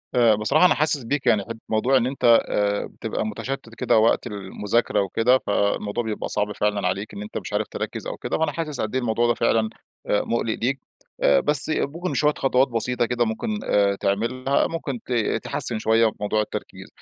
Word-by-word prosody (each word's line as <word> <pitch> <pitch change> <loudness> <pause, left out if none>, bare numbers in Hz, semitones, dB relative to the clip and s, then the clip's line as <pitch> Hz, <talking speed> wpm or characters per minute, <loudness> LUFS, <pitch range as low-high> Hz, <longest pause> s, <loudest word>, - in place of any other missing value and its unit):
آآ، 115 -3 +5
بصراحة 140 +11 +3
أنا - - +5
حاسس 150 -3 +1
بيك، 140 +4 -2
يعني 110 -4 +4
ح - - -19 0.2
موضوع 120 +5 +2
إن 125 -1 +1
أنت 135 0 -6 0.3
آآ، 100 0 0
بتبقى - - -4
متشتت 115 +2 -5
كده - - +2
وقت 110 +1 +3
المذاكرة 105 +2 -1
وكده، 115 +6 +2
فالموضوع 100 +2 0
بيبقى 110 -1 -4
صعب 105 0 -1
فعلًا 105 -2 0
عليك 100 +4 -3
إن 100 - -7
أنت 105 - -6
مش - - -6
عارف - - 0
تركز - - -5
أو - - -5
كده، - - -3
فأنا 160 - 0
حاسس 155 -5 -4
قدّ 110 +3 -3
إيه 130 - +1
الموضوع 120 0 +1
ده 120 - +3
فعلًا 115 -1 +1 0.4
آآ 105 - +2
مُقلِق 115 -1 -1
ليك، 135 +3 0 0.4
بس 150 0 +3
ممكن 170 +6 -2
شوية 150 0 +2
خطوات 135 0 +2
بسيطة 120 +1 -1
كده 120 0 0
ممكن 210 - -3 0.4
تعملها، 130 +7 0
ممكن 140 -7 -4
ت 125 - -3 0.3
تحسِّن 115 - +2
شوية 110 0 +3
موضوع 105 +1 0
التركيز. 105 - -7
115 Hz, 185 wpm, -23 LUFS, 105-135 Hz, 0.4 s, آآ